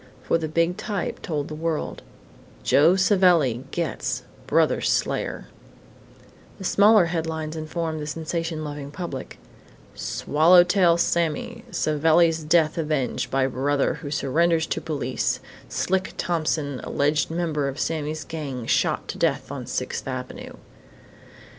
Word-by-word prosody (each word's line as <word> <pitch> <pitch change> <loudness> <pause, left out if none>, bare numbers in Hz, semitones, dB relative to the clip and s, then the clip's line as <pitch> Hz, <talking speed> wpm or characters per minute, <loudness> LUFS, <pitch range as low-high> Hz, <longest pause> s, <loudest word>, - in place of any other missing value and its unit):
For 165 - +1
the 160 - -2
big 170 +3 +1
type 205 -5 -3
told 150 -3 -3
the - - -7
world: 160 0 -3 0.6
JOE 155 - +5
SAVELLI 175 - +3
"GETS" 170 -2 -2 0.2
BROTHER'S - - +2
SLAYER - - -1 1.1
And 190 - -8
smaller 205 0 +5
headlines 160 -2 -3
informed 160 0 -3
the 150 - -5
sensation 165 +1 -3
loving 145 -2 -6
public: 150 -4 -6 0.6
"SWALLOW 170 +4 +4
TAIL 180 -2 +3
SAMMY" 225 +9 -1
SAVELLI'S 160 -1 +2
DEATH 160 0 +3
AVENGED 150 -6 -1
BY 135 0 +2
BROTHER 135 +2 0
WHO 145 - -5
SURRENDERS 160 +4 +1
TO - - -3
POLICE; 140 -5 -1 0.3
"SLICK" 190 0 -1
THOMPSON, 155 -5 -1
ALLEGED 150 +2 +1
MEMBER 160 -4 -1
OF 140 +1 -5
SAMMY'S 155 -1 -2
GANG, 140 -7 -5
SHOT - - +1
TO - - -6
DEATH - - 0
ON - - -6
SIXTH - - -3
AVENUE. - - -6
160 Hz, 125 wpm, -24 LUFS, 145-170 Hz, 1.1 s, JOE